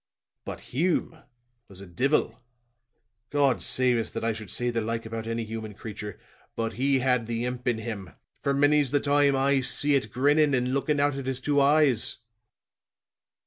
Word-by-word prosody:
But - - -6
Hume 165 +2 0 0.5
was 95 -2 -13
a 100 - -9
divil! 120 - 0 0.9
God 140 -3 +2
save 125 -1 +2
us, 115 - -2
that - - -5
I 115 0 +1
should 110 -3 -9
say 120 +5 -1
the 115 -1 -1
like 115 +1 -3
about 110 0 -5
any 115 0 -2
human 110 -1 -6
creature; 105 -2 -8 0.4
but 115 0 -2
he 135 +1 +1
had 125 -3 +1
the 115 +1 -2
imp 125 0 -5
in 120 -2 +2
him, 110 -5 -6 0.3
for 140 0 0
many's 145 0 +3
the 145 +2 +2
time 145 0 +3
I 135 +1 +2
see 145 +3 +2
it 135 -2 +1
grinning 145 +2 +3
and 125 0 0
looking 145 +2 0
out 145 -1 +1
at 135 -1 -5
his 135 -1 -2
two 145 +1 +1
eyes." 140 -4 +3
125 Hz, 180 wpm, -26 LUFS, 115-140 Hz, 0.9 s, many's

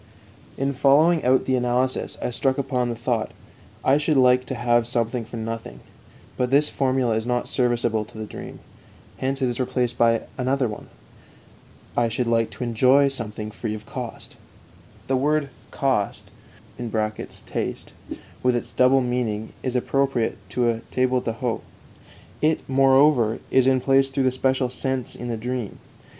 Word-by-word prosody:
In 135 +1 0
following 150 +5 +4
out 130 +1 +3
the 130 - +1
analysis 125 +1 0
I - - -1
struck 130 +2 0
upon 125 -3 -1
the 120 - -2
thought: 115 -1 -1 0.6
I 135 +2 +4
should 150 -1 +1
like 125 -1 +4
to 130 - -3
have 120 -1 +2
something 120 0 -1
for 115 +1 -8
nothing. 115 - -5 0.6
But 125 0 0
this 145 +3 +4
formula 130 -3 +1
is 110 +1 -2
not 125 0 0
serviceable 120 -3 +1
to 110 - -15
the 110 - -4
dream. - - -9 0.6
Hence 135 +1 -1
it - - +3
is 120 0 -3
replaced 125 -1 -1
by 115 -1 +4 0.2
another 130 0 +1
one: 105 - -7 1.1
"I 120 -1 +2
should 120 +2 -1
like 115 -1 +1
to - - -6
enjoy 130 +4 +4
something 110 -5 -6
free 110 0 -4
of 105 - -10
cost." 130 -4 -7 0.7
The 135 - 0
word 145 +2 +1 0.2
"kost" 130 -7 -1 1.1
(taste), - - -4 0.5
with 125 -1 +2
its 120 - -3
double 130 +1 +4
meaning, 120 -4 -2
is 130 -1 -3
appropriate 130 -2 0
to 120 +4 +1
a 115 - -4
table 130 0 +1
d'hôte; 115 +1 -2 0.8
it, 155 +1 +1
moreover, 135 -3 +4
is 130 -1 +4
in 130 -1 +4
place 135 +1 +3
through 135 0 0
the 130 - +3
special 130 0 0
sense 130 -1 -2
in 120 - -6
the 115 -1 -2
dream. 120 -1 -4
125 Hz, 160 wpm, -23 LUFS, 115-135 Hz, 1.1 s, following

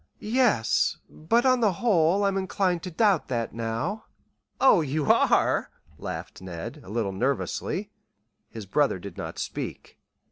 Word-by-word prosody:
"Yes; 215 - +2
but 230 +11 +1
on 255 -1 +4
the 215 -5 +3
whole 185 -2 +2
I'm 195 -1 +1
inclined 190 -2 0
to 185 - -5
doubt 195 0 +2
that 120 -3 -2
now." 115 - -3 0.5
"Oh, 260 -10 +6
you 150 0 -1
are," - - +3 0.3
laughed - - -6
Ned, 95 - -7
a - - -13
little 110 -2 -1
nervously. 140 - -2 0.6
His 110 -3 -8
brother 135 +3 +1
did 95 -1 -9
not - - -6
speak. - - -6
160 Hz, 140 wpm, -26 LUFS, -, 0.6 s, Oh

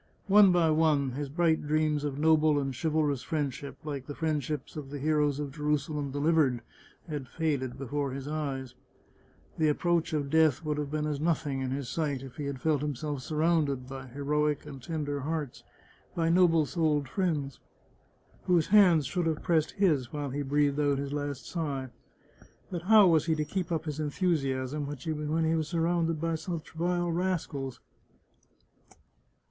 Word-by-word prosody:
One 200 -1 +7
by 170 -3 +3
one 155 -4 +2
his 140 +2 -4
bright 160 0 +1
dreams 155 -1 +1
of 145 -2 -3
noble 155 0 +4
and 135 -2 -3
chivalrous 150 -2 0
friendship 140 -3 -3
— - - -32
like 140 -3 -5
the 145 - -6
friendships 150 -3 -2
of 145 -3 -6
the 145 - -5
heroes 150 -1 +1
of 145 -2 -4
Jerusalem 150 0 -1
Delivered 145 -3 +2 0.2
— - - -29
had 145 -5 -5
faded 135 -4 -2
before 140 +1 -2
his 135 +1 -6
eyes! 140 -4 -3 0.9
The 155 -1 +4
approach 170 +2 +1
of 145 -2 -1
death 160 -2 +3
would 150 -1 -1
have 145 -1 -3
been 150 0 -1
as 150 -2 -2
nothing 150 -4 0
in 130 - -2
his 135 0 -3
sight 145 -3 -2
if 130 -2 -11
he 150 - -4
had 140 -2 -4
felt 150 0 +1
himself 145 -1 -3
surrounded 150 -4 0
by 135 0 -8
heroic 150 +3 -1
and 140 -3 -9
tender 145 -1 -3
hearts, 150 -1 -4 0.5
by 165 -1 +1
noble 165 -3 +4
souled 150 -3 0
friends, 150 - -2 0.9
whose 175 -4 +2
hands 185 -7 +6
should 165 +6 -1
have 160 -2 -1
pressed 160 -4 +1
his 155 -11 +1
while 145 -3 -4
he 145 +2 -2
breathed 145 +1 +1
out 145 -2 +2
his 140 0 -4
last 145 -2 -4
sigh. 140 -6 -3 0.8
But 175 -2 -3
how 210 +3 +7
was 165 -3 +3
he 160 - +2
to 155 -1 -1
keep 180 +1 -3
up 160 -1 -1
his 150 -1 -4
enthusiasm 145 -3 -1
when 150 +3 -2
he 160 - +2
was 160 -2 0
surrounded 165 -1 0
by 165 +1 -1
such 160 0 -5
vile 175 +1 0
rascals? 165 -7 -2
150 Hz, 170 wpm, -29 LUFS, 140-160 Hz, 0.9 s, One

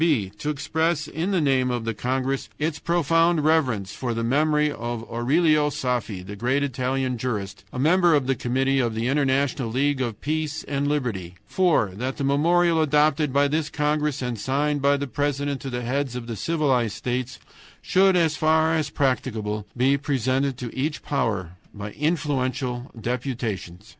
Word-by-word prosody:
"b. 135 - +2
To 150 - -2
express 155 +1 0
in 165 +5 -3
the 190 -3 +2
name 135 -4 +2
of 120 -2 -2
the 115 - -1
congress 130 +4 -2
its 150 0 -2
profound 165 0 +2
reverence 130 -12 +1
for 120 -3 -3
the 115 - -2
memory 150 +4 +2
of 120 -3 -4
Aurelio 150 +5 +2
Saffi, 120 -9 -2
the 105 +2 -7
great 130 +6 0
Italian 130 -1 -1
jurist, 100 -5 -4
a - - -7
member 170 +4 +4
of 140 -3 +1
the 135 - +2
committee 135 +2 0
of 120 -3 0
the 115 +2 -1
International 135 -2 +1
League 135 +3 +1
of 115 -4 -3
Peace 155 0 -2
and 140 0 -2
Liberty. 115 -12 -2
"(4) 170 - +2
That 125 +7 -4
the 140 - -2
memorial 165 +4 +3
adopted 150 -1 +2
by 140 +2 +3
this 155 +1 -1
congress 150 -2 0
and 120 -3 -3
signed 145 +5 0
by 140 +1 +3
the 140 - -2
president 145 +1 -2
to 135 - -5
the 125 -1 -3
heads 130 +1 -1
of 125 -2 -5
the 115 -1 -5
civilized 130 -7 0
states 125 +2 -3 0.4
should, 190 0 +3
as 165 -3 +3
far 160 +2 +3
as 155 -2 0
practicable, 110 -7 -1
be 135 +3 +3
presented 135 -1 0
to 125 -2 -6
each 150 +3 -2
power 100 - -2 0.2
by 105 0 -6
influential 130 -5 -1
deputations. 115 -6 -4
135 Hz, 170 wpm, -24 LUFS, 120-150 Hz, 0.4 s, member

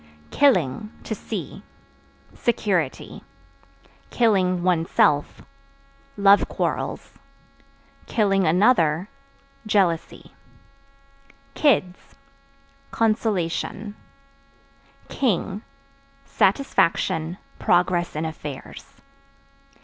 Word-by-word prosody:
Killing 210 - +2
(To - - -4
see) 200 -5 -6 0.7
security; 210 -6 -2 1.0
(one's 185 -6 +2
self) 145 -1 +1 0.7
love 200 0 +5
quarrels; - - -4 1.0
(another) 195 -3 +3 0.6
jealousy. 185 -6 0 1.2
Kids 200 -11 +2 0.9
Consolation. 210 -2 -1 1.1
King 210 -5 -1 0.6
Satisfaction, 170 - +1 0.2
progress 175 -1 +1
in 155 +1 -2
affairs. 150 -3 -9
185 Hz, 50 wpm, -23 LUFS, 165-215 Hz, 1.2 s, love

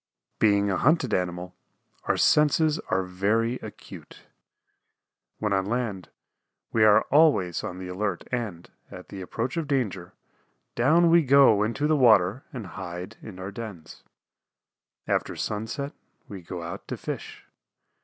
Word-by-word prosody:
Being 100 -2 +3
a 95 - 0
hunted 135 - +2
animal 90 0 -2 0.5
our - - +1
senses 150 +1 +3
are 95 0 +1
very 105 +6 0
acute. 110 -2 -12 1.1
When 105 -2 -1
on 95 0 0
land 110 -7 -3 0.6
we 115 - +3
are 105 -1 +6
always 140 - +3
on 90 - -5
the 95 0 -7
alert 95 0 -3
and, 110 -9 -4 0.2
at - - -11
the 95 - -8
approach 115 - -4
of 165 -3 -2
danger, 105 - -2 0.6
down 165 +7 +4
we 170 0 +6
go 135 -7 +5
into 115 +7 -1
the 155 +1 +3
water 110 - +4
and 125 -8 -6
hide 90 +2 -7
in 105 -4 -10
our 95 +2 -6
dens. 100 -7 -9 1.0
After - - -1
sunset 115 +7 -4 0.3
we 100 -3 -8
go 85 0 -7
out 85 +1 -7
to - - -5
fish. - - -7
105 Hz, 140 wpm, -26 LUFS, 95-130 Hz, 1.1 s, are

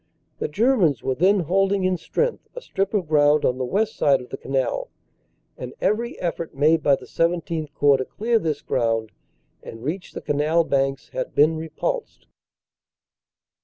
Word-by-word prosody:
The - - -1
Germans 195 - +2
were 135 - 0
then 190 +7 +3
holding 195 +3 +1
in 185 0 +2
strength 470 - -2
a - - -6
strip 195 - -2
of 185 -6 0
ground 150 -1 +4
on 125 +1 0
the - - -1
west 210 - 0
side 140 -2 +3
of 125 - -11
the - - -5
canal, 135 -2 -2 0.7
and 125 -1 -7
every 225 +5 -1
effort 170 -3 -4
made 155 +3 +3
by 140 -1 +4
the - - -12
XVII 165 -2 -1
Corps 140 -1 +4
to 130 - -3
clear 230 - 0
this 155 -6 -3
ground 115 -2 0 0.5
and 115 +1 -10
reach 170 +7 -4
the - - -6
Canal 150 +3 +1
banks 135 0 -1
had - - -5
been 155 +3 +4
repulsed. 310 - -4
160 Hz, 165 wpm, -23 LUFS, 140-195 Hz, 0.7 s, ground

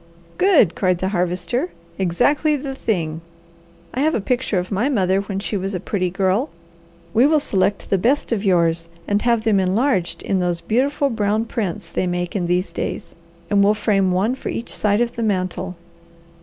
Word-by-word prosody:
"Good!" 335 - +5
cried 185 -2 +1
the 185 +2 -1
Harvester. 180 - -1 0.3
"Exactly 245 - +2
the 275 -1 -4
thing! 165 - -2 0.7
I 255 - -3
have 310 +3 +2
a - - +1
picture 240 -1 -1
of 180 +2 -2
my 215 +8 +1
mother 195 -6 +2
when 200 -1 -5
she 200 +2 -3
was 195 0 -2
a - - -2
pretty 185 0 -1
girl. 195 - 0 0.6
We 240 +5 +5
will 310 0 +4
select 200 -7 0
the 195 - +3
best 260 +9 +1
of 215 -3 0
yours 170 -3 +2 0.2
and 205 0 +1
have 235 -2 +2
them 215 -3 +3
enlarged 190 0 0
in 195 - 0
those 175 -1 0
beautiful 265 +9 0
brown 215 0 0
prints 210 -3 -4
they 185 - -1
make 175 +1 -2
in 180 -4 0
these 180 +2 0
days, - - -4 0.4
and 200 -1 +4
we'll 205 +1 +4
frame 195 -3 +2
one 195 +7 +1
for 260 - -5
each 235 - -4
side 210 +1 +1
of 240 0 -1
the - - -2
mantel. 185 -2 -1
200 Hz, 185 wpm, -21 LUFS, 185-235 Hz, 0.7 s, Good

